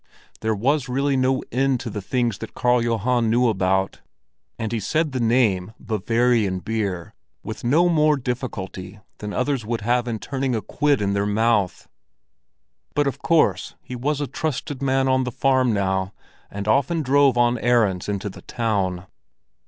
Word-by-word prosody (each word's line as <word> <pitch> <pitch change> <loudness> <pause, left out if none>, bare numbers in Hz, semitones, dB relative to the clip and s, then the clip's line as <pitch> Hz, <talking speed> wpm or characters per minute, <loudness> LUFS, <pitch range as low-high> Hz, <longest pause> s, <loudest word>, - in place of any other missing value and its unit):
There 110 0 0
was 135 +5 0
really 135 +2 +1
no 130 0 +1
end 130 +1 +1
to - - -5
the 105 - -4
things 120 0 -1
that - - -8
Karl 125 -1 +2
Johan 115 +1 +1
knew 120 +2 +3
about; 95 -2 0 0.6
and 110 -1 -3
he 115 - -1
said 155 - 0
the 130 - -2
name 110 -5 +2
"Bavarian 115 -1 +1
beer" 100 -3 -3 0.3
with 110 - -7
no 155 +9 +4
more 155 -3 +3
difficulty 105 -6 -5 0.2
than 105 0 -5
others 125 +1 -1
would 115 +1 -3
have 120 +3 +1
in 115 -2 -2
turning 130 +4 -2
a 110 - -1
quid 145 -6 +1
in 100 0 0
their 100 0 0
mouth. 105 -2 +1 1.1
But 145 - +2
of 140 - -2
course 165 -2 +2
he 125 - -8
was 140 +4 -1
a 145 - -1
trusted 145 -1 -4
man 135 -1 +1
on 130 0 +2
the 125 - -3
farm 130 0 +2
now 95 -1 -1 0.4
and 100 +1 -6
often 145 +8 +2
drove 140 -1 +4
on 120 0 +3
errands 110 -7 +2
into 100 0 -2
the 100 - -9
town. 95 -6 -2
120 Hz, 170 wpm, -23 LUFS, 105-130 Hz, 1.1 s, no